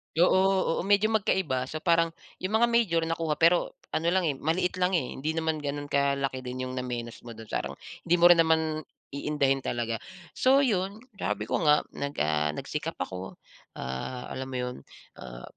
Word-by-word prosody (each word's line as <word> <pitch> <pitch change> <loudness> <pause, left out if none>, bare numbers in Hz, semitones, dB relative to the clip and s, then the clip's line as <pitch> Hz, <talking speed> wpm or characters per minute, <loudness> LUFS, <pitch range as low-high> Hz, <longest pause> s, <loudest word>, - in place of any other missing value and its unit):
Oo, 185 +1 +3
oo, - - 0
medyo 205 +2 +4
magkaiba. 185 -11 +1
So 155 +3 -6
parang, 165 -1 +3 0.2
'yung 190 +4 -1
mga 235 +2 +5
major 215 -9 +3
nakuha, 165 -1 -1
pero 170 +3 +3 0.2
ano 165 - 0
lang, 185 +2 +3
eh, 160 - +2
maliit 175 +6 -1
lang, 180 +1 +2
eh. 155 -7 -1
Hindi 155 +4 -3
naman 160 -1 0
gano'n 145 0 -4
kalaki 140 -1 +1
din 130 0 -5
'yung 130 - -4
namenos 120 -2 -4
mo 115 - -8
do'n. 110 0 -11
Parang - - -2 0.3
hindi 175 - +5
mo 175 0 +7
rin 170 - +6
naman 160 -1 +2 0.3
iindahin 140 -1 +1
talaga. 115 -3 -2 0.3
So 270 +2 +4
'yon, 200 -2 -1 0.2
sabi 105 0 -1
ko 110 - -1
nga, 150 0 +5
nag 140 0 -4
ah, 75 0 +1
nagsikap - - -4
ako, 95 0 -6 0.4
ah, 65 - -5
alam 130 0 -4
mo 130 - -6
'yon. 125 0 -2 0.4
Ah, - - -9
155 Hz, 180 wpm, -28 LUFS, 130-175 Hz, 0.4 s, mo